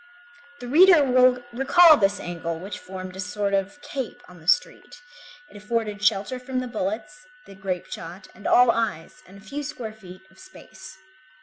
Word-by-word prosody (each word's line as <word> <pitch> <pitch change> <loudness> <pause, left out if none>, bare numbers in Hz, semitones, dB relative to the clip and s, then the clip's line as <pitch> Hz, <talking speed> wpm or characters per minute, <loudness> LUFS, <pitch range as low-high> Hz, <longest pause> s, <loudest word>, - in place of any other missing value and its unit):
The 245 - -7
reader 335 +3 +6
will 255 -1 +3
recall 310 +6 +6
this 195 -6 +1
angle 170 -1 -5
which 195 +4 -7
formed 185 0 -9
a - - -10
sort 200 +2 -3
of 195 +9 -1
cape 265 -5 -6
on 180 -1 -15
the 160 - -18
street; 295 +4 0 0.5
it - - -18
afforded 210 0 -3
shelter 215 +4 0
from 255 +1 -4
the 255 - -4
bullets, 230 +7 -5 0.2
the 195 - -13
grape 190 -2 -4
shot, 175 +4 -9
and 210 - -8
all 245 -1 +5
eyes, 225 - -4
and 195 - -15
a - - -15
few 285 +7 -5
square 245 -6 -7
feet 190 -3 -14
of 190 - -22
space. 305 0 -14
215 Hz, 180 wpm, -24 LUFS, 190-260 Hz, 0.5 s, reader